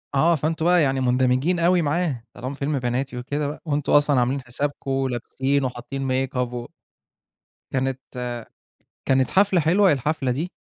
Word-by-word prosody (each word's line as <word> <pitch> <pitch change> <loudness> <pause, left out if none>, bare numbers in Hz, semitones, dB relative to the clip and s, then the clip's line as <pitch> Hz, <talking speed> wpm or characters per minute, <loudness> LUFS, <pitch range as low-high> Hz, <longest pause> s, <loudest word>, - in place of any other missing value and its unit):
آه. 165 +5 +4
فأنتم 160 +2 -1
بقى 175 -1 +5
يعني 135 -2 +1
مُندمجين 130 +7 +2
أوي 175 +1 +3
معاه 150 -5 -1
طالما 130 +3 -6
فيلم 140 0 -1
بناتي 125 +1 -2
وكده 145 +4 -2
بقى 150 - -6
وأنتم 145 -2 0
أصلًا 145 -2 +5
عاملين 130 +3 0
حسابكم 135 +1 -2
لابسين 135 +3 -1
وحاطين 130 +2 -4 0.2
makeup 130 -1 -8 0.2
و 120 -1 -5 1.1
وكانت 130 0 -1 1.1
كانت 130 -1 +3
حفلة 195 -2 +3
حلوة 180 +3 +4
الحفلة 135 0 -1
دي؟ 155 +9 -2
140 Hz, 145 wpm, -23 LUFS, 130-155 Hz, 1.1 s, بقى